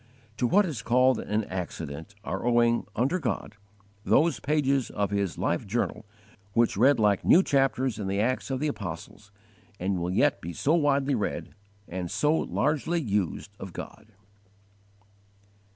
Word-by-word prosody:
To 125 - +1
what 205 - +4
is 145 - -4
called 125 +3 +3
an 105 +1 -1
accident 85 -1 -6
are 95 -3 -4
owing, 120 0 +2
under 135 +11 +1
God, 120 -6 -3 0.5
those 165 +3 +3
pages 140 -3 +1
of 100 -1 -2
his 100 -3 -1
life - - -1
journal 110 0 -2 0.5
which 115 +1 +2
read 130 +6 +4
like 105 -3 +3
new 185 - +6
chapters 135 - +1
in 100 - -3
the 100 +1 -1
Acts 130 +6 0
of 130 -1 -1
the 150 - 0
Apostles, 100 - -7 0.5
and 95 0 -1
will 85 +1 -2
yet 90 - +2
be 85 +2 -6
so 145 - +1
widely 140 -3 +2
read, 110 -5 -3 0.3
and 90 0 -4
so 150 - +2
largely 155 +2 0
used 100 - -2
of 95 -2 -8
God. 110 - -9
115 Hz, 150 wpm, -27 LUFS, 100-140 Hz, 0.5 s, new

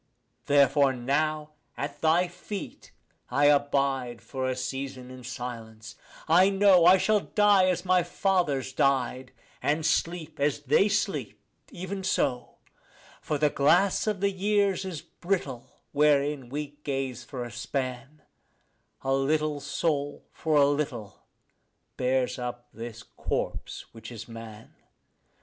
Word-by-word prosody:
Therefore 140 -1 +4
now 150 +4 -1 0.3
at 145 +1 -5
thy 165 +3 +3
feet 180 +3 -8 0.4
I 140 +3 +2
abide 140 -4 +2
for 130 -1 -4
a 130 - -1
season 130 0 -5
in 130 -1 -10
silence. 115 -2 -7 0.3
I 180 +4 +6
know 195 -3 +5
I 185 +2 +8
shall 215 +2 +3
die 205 -2 +4
as 180 0 -1
my 185 0 +4
fathers 175 -7 0
died, 130 -1 0 0.3
and 155 +2 0
sleep 165 -3 -1
as 145 0 +1
they 150 +9 +3
sleep; 205 0 -1 0.3
even 190 +2 -6
so. 135 -9 -1 0.7
For 150 - -2
the 150 0 +2
glass 180 +9 +3
of 210 -3 -1
the 200 0 +2
years 200 0 +1
is 180 -5 -5
brittle 140 -9 -4
wherein 145 -3 +2
we 145 +1 -5
gaze 135 -3 -3
for 125 0 -6
a 120 - -7
span; 130 +4 -5 0.8
A 135 - +1
little 150 +2 +1
soul 145 0 -2
for 155 -1 -1
a 145 -1 +6
little 140 -8 -3 0.7
bears 125 0 0
up 125 0 -6
this 115 0 -8
corpse - - -4
which 115 +1 -10
is 110 -1 -8
man. 115 -1 -10
145 Hz, 130 wpm, -27 LUFS, 130-175 Hz, 0.8 s, I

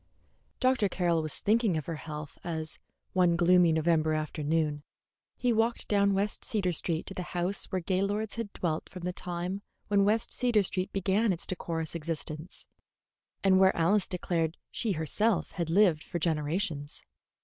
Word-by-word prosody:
Dr. 255 -5 +3
Carroll 175 -3 +1
was 155 -1 -1
thinking 215 -4 +2
of 155 - -4
her 165 - -4
health 150 -2 -8
as, 160 -2 -4 0.3
one 180 -2 +4
gloomy 175 0 +5
November 160 0 +2
afternoon, 155 0 -1 0.6
he 245 -1 +2
walked 225 +1 +1
down 200 -1 +3
West 200 +1 -1
Cedar 195 -5 0
Street 165 0 -1
to - - -7
the 185 - -4 0.2
house 180 +4 +2
where 185 -2 -2
Gaylords 200 +4 0
had 230 -3 -4
dwelt 165 -5 -2
from 180 -2 -9
the 180 0 -2
time 180 +2 -4 0.3
when 200 -1 +4
West 215 +3 +1
Cedar 240 -5 +2
Street 185 0 -2
began 195 +3 +2
its 175 - -3
decorous 165 -3 -3
existence, 160 0 -5 0.8
and 190 -1 +5
where 190 0 +5
Alice 185 +4 +3
declared 170 -2 -1
she 220 -4 0
had - - -5
herself 185 +6 0
lived 170 -1 +3
for 175 - -4
generations. 155 -1 -1
180 Hz, 160 wpm, -29 LUFS, 160-200 Hz, 0.8 s, gloomy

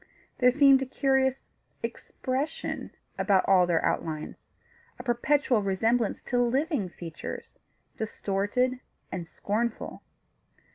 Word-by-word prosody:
There 250 -1 +6
seemed 275 0 +6
a 270 - -2
curious 265 0 +1 0.4
expression 270 +4 -3 0.3
about 195 -3 +3
all 185 -2 +5
their 170 -2 +2
outlines 155 -2 -2 0.6
a 245 - -8
perpetual 245 -1 +2
resemblance 220 +4 +1
to 245 -1 +1
living 260 - +1
features, 165 -1 -8 0.4
distorted 220 +4 0 0.3
and 175 -3 -4
scornful. 220 +6 -3
240 Hz, 100 wpm, -28 LUFS, 195-265 Hz, 0.6 s, There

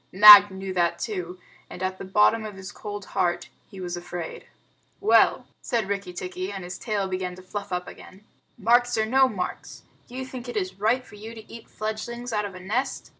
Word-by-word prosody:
Nag 205 +1 +10
knew 190 0 -6
that 170 -1 +1
too 180 -2 -5 0.3
and, 180 - -7
at 185 0 -2
the - - -6
bottom 210 +3 +3
of 215 -2 -7
his 190 +1 -9
cold 205 -1 -7
heart, 175 -2 0 0.2
he 195 - -11
was 175 -1 -4
afraid. 175 -1 -7 0.5
"Well," 415 - +4 0.2
said 230 -4 -1
Rikki 200 -2 -3
tikki, 185 +1 -5
and 195 -2 -6
his 180 +1 -7
tail 210 -4 -2
began 185 -1 -3
to 185 - -13
fluff 200 +1 -6
up 180 0 -3
again, 190 +3 -13 0.3
"marks 245 +3 +3
or 220 - +2
no 265 +3 +4
marks, 185 -5 -6 0.2
do 245 - -12
you 260 0 -4
think 255 -1 -8
it 240 - -4
is 185 -1 -3
right 240 +5 +1
for 210 - -14
you 220 +2 -9
to 220 -1 -12
eat 230 - -12
fledglings 235 +3 -5
out 210 -1 0
of 195 -2 -7
a - - -8
nest?" 215 +9 -3
200 Hz, 210 wpm, -25 LUFS, 185-220 Hz, 0.5 s, Nag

